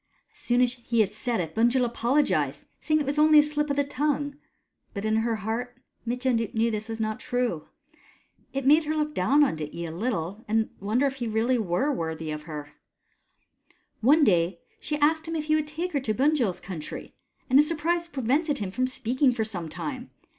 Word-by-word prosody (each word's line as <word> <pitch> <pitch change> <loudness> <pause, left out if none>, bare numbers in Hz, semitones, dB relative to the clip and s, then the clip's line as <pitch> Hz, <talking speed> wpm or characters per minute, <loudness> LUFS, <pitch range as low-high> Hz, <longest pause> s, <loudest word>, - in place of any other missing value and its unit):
As - - -21
soon 245 +1 +1
as 250 -1 +3
he 235 -2 0
had 205 -1 0
said 235 +1 -2
it, 160 -2 -3
Bunjil 240 +2 +3
apolo 245 +5 +2
gized, - - -1
saying 310 -1 +1
that 300 - +1
it - - -7
was 285 +2 -1
only 305 0 +6
a 295 - +9
slip 295 0 -1
of 280 - 0
the 285 - +2
tongue 285 0 -1 0.3
— - - -44
but 200 +1 -3
in 220 0 +2
her 225 0 +1
heart 230 +4 -4 0.3
Mitjen 250 0 +1 0.2
knew 230 +1 +2
this 215 +1 -4
was 225 0 -4
not 215 -1 -2
true. 245 -11 -2 0.8
It 270 -1 -3
made 305 +3 +5
her 310 +1 -1
look 300 0 -1
down 280 +8 +4
on 270 - +1
Dityi 155 +3 -5
a - - -6
little, 195 +1 -3
and 220 +1 +1
wonder 220 +7 +1
if 270 -1 -1
he 240 -3 -3
were 220 0 0
reallj^' 235 +2 +1
worthy 160 -3 -4
of 150 0 -4
her. 150 -1 -6 1.3
One 295 +7 +5
day 170 -5 +2 0.2
she 300 - -3
asked 315 +2 +2
him 330 - -3
if 310 - -1
he 310 - +1
would 310 -1 +1
take 335 +4 -3
her 285 - +2
to 220 -5 -2
Bunjil's 255 - +1
country, 175 -5 -7 0.3
and 265 +1 +5
his 300 - +5
surprise 335 +2 0
prevented 285 +1 0
him 200 -6 -4
from 255 +5 0
speaking 255 +1 +1
for 220 - 0
some 175 -7 -4
time. 255 - -6
245 Hz, 210 wpm, -26 LUFS, 215-290 Hz, 1.3 s, a